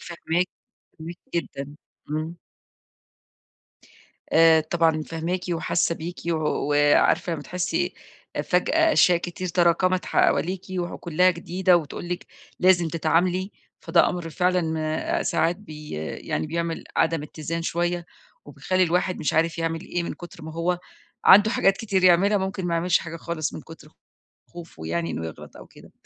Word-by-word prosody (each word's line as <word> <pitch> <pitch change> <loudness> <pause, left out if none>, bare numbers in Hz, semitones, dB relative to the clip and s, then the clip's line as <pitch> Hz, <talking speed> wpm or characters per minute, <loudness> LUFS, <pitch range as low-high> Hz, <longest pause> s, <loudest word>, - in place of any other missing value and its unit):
فاهماكِ، 175 +1 -2 0.5
فاهماكِ 165 +2 -8 0.2
جدًا، 145 -4 -4 0.3
إمم. 155 +3 -3 1.9
آآ 160 0 +6
طبعًا 160 0 +1
فاهماكِ 165 +3 -3
وحاسة 170 0 0
بيكِ، 170 +2 -6
وعارفة 150 +2 +2
أمّا 150 -3 -4
تحسي 180 +2 -2 0.4
أ - - 0
فجأة 320 - +2
أشياء 175 -1 +5
كتير 175 +1 -5
تراكمت 180 +1 +2
حواليكِ، 185 +3 +1 0.2
وكلها 175 0 +1
جديدة 180 +1 +2
وتقول 170 +1 -5
لِك، 180 0 -4 0.3
لازم 180 -2 +4
تتعاملي 175 +4 +1 0.3
فده 170 0 +3
أمر 170 -2 -4
فعلًا 180 -1 +1 0.4
آآ - - -1
ساعات 170 +2 +1
بي 155 -7 -11 0.4
يعني - - -1
بيعمل 170 +1 -3
عدم 160 -2 +2
اتّزان 155 +2 -5
شوية، 175 +1 -1 0.4
وبيخلّي 185 0 -1
الواحد 180 +1 +1
مش 155 - -1
عارف 165 +1 +1
يعمل 165 0 -1
إيه 175 -2 -3
من 170 - -4
كتر 175 -2 -12
ما 160 - -7
هو 170 +2 -1 0.5
عنده 210 +2 +8
حاجات 195 -4 +3
كتير 195 -4 0
يعملها 190 +4 +5
ممكن 190 -1 -3
ما 170 - 0
يعملش 175 +1 +2
حاجة 165 0 -7
خالص 165 -2 -4
من - - -6
كتر 160 0 -14 0.6
خوفه 165 - -10
يعني 85 0 -2
إنه 80 0 -4
يغلط 80 - -10
أو - - -12
كده، - - -17
170 Hz, 145 wpm, -24 LUFS, 160-180 Hz, 1.9 s, عنده